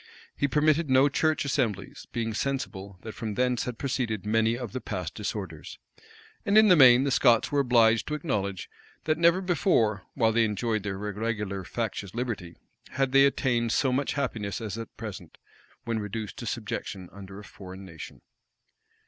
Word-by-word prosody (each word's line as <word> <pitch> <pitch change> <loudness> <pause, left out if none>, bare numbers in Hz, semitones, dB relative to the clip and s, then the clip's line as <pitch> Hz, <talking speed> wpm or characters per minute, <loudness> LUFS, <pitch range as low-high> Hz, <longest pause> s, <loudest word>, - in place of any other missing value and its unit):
He 140 - +1
permitted 150 +2 +2
no 130 +2 +5
church 155 +2 +1
assemblies; 125 - -2
being 115 -2 -2
sensible 105 -7 -3
that 110 - -7
from 110 -3 -5
thence 125 0 +1
had 125 -2 -5
proceeded 120 -7 -2
many 115 +2 +2
of 120 -5 -6
the - - -5
past - - -4
disorders. - - -6 0.7
And 200 +2 +3
in 215 -1 +7
the 180 - +8
main, 130 -4 +7
the 140 - 0
Scots 120 -2 +4
were 145 - +2
obliged 115 -4 +4
to 150 - -2
acknowledge, 100 - -3 0.4
that 155 0 0
never 170 +2 +4
before, 155 - +1
while 110 -2 +3
they 115 +1 +3
enjoyed 110 +1 -1
their 100 0 -4
irregular, 105 -1 -3
factious 105 -2 -4
liberty, 110 -8 -4 0.4
had 135 -1 0
they 135 0 +6
attained 120 -4 +1
so 130 -2 +2
much 140 +2 0
happiness 115 -8 -3
as 110 -4 -5
at 115 0 -8
present, 100 -7 -8 0.5
when 115 -1 -1
reduced 105 0 -5
to - - -6
subjection 95 -2 -4
under 95 0 -10
a 105 - -9
foreign 95 -1 -11
nation. 80 -4 -10
115 Hz, 170 wpm, -27 LUFS, 105-135 Hz, 0.7 s, the